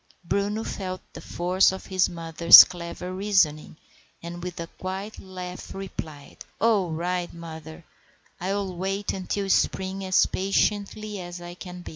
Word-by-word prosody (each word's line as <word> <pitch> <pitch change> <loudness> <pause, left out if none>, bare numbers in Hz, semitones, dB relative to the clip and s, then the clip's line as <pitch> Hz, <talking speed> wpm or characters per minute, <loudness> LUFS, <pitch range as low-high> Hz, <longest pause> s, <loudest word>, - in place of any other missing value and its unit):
Bruno 205 +4 -1
felt 185 -4 -5
the - - -9
force 180 +2 +2
of 190 - -7
his 185 -1 +1
mother's 170 0 +9
clever 180 +1 -7
reasoning, 185 -7 +1 0.5
and 170 +1 -7
with 180 -1 -6
a 170 - -3
quiet 190 +5 -7
laugh 185 -1 -8
replied,— 160 -6 -8 0.2
"All 210 -6 +2
right, 175 +2 -2
mother: 160 -1 -10 0.5
I'll 190 0 -2
wait 195 +3 -2
until 195 +1 -3
spring 190 +1 0
as 185 -1 +4
patiently 205 +2 -1
as 175 0 -8
I 175 0 -8
can." 180 0 -10
185 Hz, 135 wpm, -25 LUFS, 175-195 Hz, 0.5 s, mother's